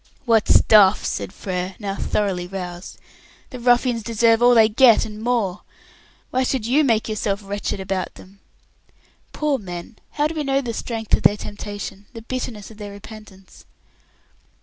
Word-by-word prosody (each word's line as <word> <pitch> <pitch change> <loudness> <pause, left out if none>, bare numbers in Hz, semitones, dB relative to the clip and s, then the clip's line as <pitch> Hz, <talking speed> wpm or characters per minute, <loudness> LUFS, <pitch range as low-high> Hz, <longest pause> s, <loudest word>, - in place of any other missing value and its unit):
"What 225 -3 +3
stuff!" 210 -2 +5
said - - -3
Frere, 185 0 -4
now 200 -2 -4
thoroughly 190 -4 -1
roused. 180 -1 -7 0.5
"The 255 - -7
ruffians 245 0 +2
deserve 230 +1 +2
all 245 0 +6
they 220 -1 +7
get 230 +1 +5
and 215 0 -9
more. 225 -6 -1 0.7
Why 255 - +1
should 255 -3 -1
you 275 +6 +3
make 225 -5 +1
yourself 210 -2 -2
wretched 205 0 -4
about 190 -1 -3
them?" 195 +2 -16 0.9
"Poor 295 -3 -1
men! 180 +2 -8 0.2
How 295 - 0
do 310 - -1
we 310 -2 -3
know 275 -1 +1
the 240 -4 -4
strength 225 -1 -5
of - - +4
their 205 - +4
temptation, 205 -1 -7
the 230 -2 -9
bitterness 230 -4 -5
of 220 - -15
their 205 -1 -7
repentance?" 200 -2 -13
215 Hz, 160 wpm, -21 LUFS, 195-240 Hz, 0.9 s, they